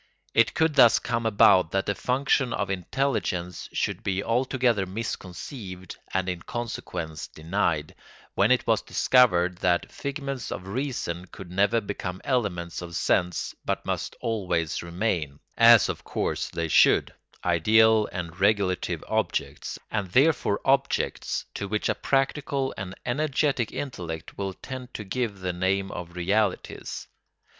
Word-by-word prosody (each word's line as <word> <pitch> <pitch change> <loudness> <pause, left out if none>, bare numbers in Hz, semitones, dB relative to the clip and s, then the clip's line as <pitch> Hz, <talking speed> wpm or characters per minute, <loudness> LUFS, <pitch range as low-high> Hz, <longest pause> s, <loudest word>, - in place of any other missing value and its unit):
It 115 - +3
could 160 -1 +2
thus 120 -5 +7
come 115 -1 -1
about 95 -5 +5
that 95 0 +1
the 100 - 0
function 130 +1 +1
of 100 -1 -1
intelligence 90 -4 -2
should - - -1
be 95 0 -1
altogether 120 -4 +1
misconceived 95 - -6 0.2
and 95 -1 0
in 90 -2 -3
consequence 85 -10 -5
denied, 80 -2 -1 0.4
when - - +3
it - - +3
was - - +2
discovered 90 -8 +3
that 90 -2 +1
figments 140 -2 -4
of 90 - -5
reason 100 -6 -3
could 90 -1 -11
never 100 +5 +3
become 100 -3 -5
elements 90 -11 -1
of 85 -1 -7
sense 90 +1 0
but - - -2
must - - -3
always 90 -8 -1
remain, 85 -5 -2 0.2
as 115 -1 +7
of - - -4
course - - -2
they 85 0 -2
should, - - +4 0.3
ideal 110 +5 +4
and 85 -2 -6
regulative 100 -2 +1
objects, - - -2
and 105 -4 -2
therefore 135 -7 +3
objects 135 +1 +1
to 100 - -4
which 105 +1 -1
a - - +3
practical 135 0 0
and 95 -1 -6
energetic 140 -2 0
intellect 85 - -6
will 95 -1 -3
tend 130 -1 -8
to 105 - -4
give 105 -1 -3
the 90 -1 -2
name 95 +2 0
of 85 0 -7
realities. 100 +3 -1
100 Hz, 135 wpm, -26 LUFS, 90-120 Hz, 0.4 s, thus